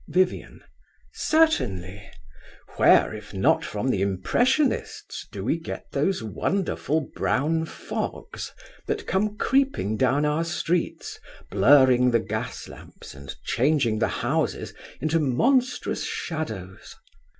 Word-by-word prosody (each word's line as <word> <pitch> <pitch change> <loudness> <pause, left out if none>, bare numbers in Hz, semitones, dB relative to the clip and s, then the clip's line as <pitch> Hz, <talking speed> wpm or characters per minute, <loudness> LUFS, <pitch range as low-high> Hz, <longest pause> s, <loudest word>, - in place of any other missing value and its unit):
VIVIAN. 185 0 0 0.5
Certainly. 100 - +1 0.7
Where, - - +5
if 105 -1 -9
not 95 - +3
from 120 +5 -2
the 95 - 0
Impressionists, 240 - 0
do - - -6
we - - 0
get - - -7
those 190 -10 0
wonderful 160 - -1
brown 160 +4 +1
fogs - - -5 0.4
that - - -2
come 210 +3 0
creeping 265 - +1
down 135 +4 +2
our 150 +2 +1
streets, 170 0 -2 0.3
blurring 130 -2 +5
the 120 -1 +3
gas 110 +2 -5
lamps - - -12
and 70 0 -9
changing 130 -5 +1
the 110 - +2 0.2
houses - - -1 0.3
into 155 +3 +1
monstrous 245 - +1
shadows? 110 - -5
140 Hz, 110 wpm, -25 LUFS, 110-180 Hz, 0.7 s, Where